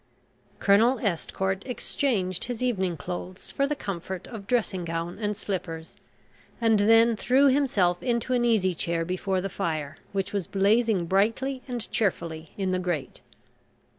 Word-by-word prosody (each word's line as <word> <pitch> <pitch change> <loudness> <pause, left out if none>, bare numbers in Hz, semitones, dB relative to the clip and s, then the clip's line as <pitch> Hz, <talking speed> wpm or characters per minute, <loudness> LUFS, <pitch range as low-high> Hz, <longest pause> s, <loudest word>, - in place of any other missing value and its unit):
Colonel 225 +6 +4
Estcourt 190 -1 -1
exchanged 210 -7 -1
his 245 0 -4
evening 190 -9 0
clothes 180 +4 -6
for 275 - +1
the 295 - -1
comfort 190 - -5
of 215 -5 -9
dressing 210 -7 0
gown 165 +2 -4
and 210 -2 -1
slippers, 165 -6 -5 0.6
and 225 -3 +3
then 225 +2 +5
threw 260 +6 +4
himself 210 -11 +2
into 240 0 0
an 245 -1 +2
easy 215 -6 +3
chair 165 0 -1
before 185 +1 -1
the 195 - -2
fire 155 -5 -3
which 195 0 -2
was 200 -4 -1
blazing 205 -1 +2
brightly 230 +9 +1
and 245 -3 -4
cheerfully 165 -6 -1
in 190 -2 0
the 185 - +1
grate. 175 -7 -3
195 Hz, 145 wpm, -27 LUFS, 180-230 Hz, 0.6 s, then